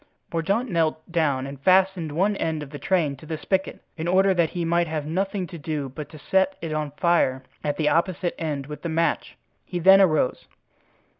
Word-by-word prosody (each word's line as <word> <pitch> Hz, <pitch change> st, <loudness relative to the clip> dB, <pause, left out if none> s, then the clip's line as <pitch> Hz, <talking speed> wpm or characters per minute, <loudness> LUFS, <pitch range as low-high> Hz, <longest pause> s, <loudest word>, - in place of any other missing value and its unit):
Mordaunt 195 Hz, +10 st, 0 dB
knelt 160 Hz, -2 st, -1 dB
down 145 Hz, -6 st, +1 dB
and 140 Hz, 0 st, -8 dB
fastened 185 Hz, -2 st, +3 dB
one 195 Hz, +7 st, +1 dB
end 160 Hz, -2 st, -2 dB
of 140 Hz, -, -11 dB
the 145 Hz, -, -7 dB
train 165 Hz, -7 st, +1 dB
to 155 Hz, -, -14 dB
the 160 Hz, -, -3 dB
spigot, 190 Hz, +4 st, -2 dB, 0.2 s
in 160 Hz, +1 st, -3 dB
order 190 Hz, +2 st, +4 dB
that 170 Hz, -3 st, +2 dB
he 175 Hz, -1 st, -3 dB
might 170 Hz, +1 st, +2 dB
have 155 Hz, -2 st, -3 dB
nothing 190 Hz, +4 st, -1 dB
to 170 Hz, 0 st, -9 dB
do 145 Hz, -2 st, -3 dB
but 145 Hz, +2 st, -8 dB
to 155 Hz, -, -11 dB
set 190 Hz, +5 st, +1 dB
it 165 Hz, -2 st, -4 dB
on 155 Hz, -1 st, -2 dB
fire 150 Hz, -7 st, +2 dB, 0.2 s
at 145 Hz, -1 st, -1 dB
the 155 Hz, -, +1 dB
opposite 175 Hz, +2 st, +1 dB
end 145 Hz, -4 st, -2 dB
with 150 Hz, +1 st, -8 dB
the 170 Hz, -, -3 dB
match. 165 Hz, +1 st, -1 dB, 0.3 s
He 180 Hz, -, -5 dB
then 190 Hz, +3 st, +7 dB
arose. 155 Hz, -8 st, +2 dB
165 Hz, 205 wpm, -24 LUFS, 150-185 Hz, 0.3 s, then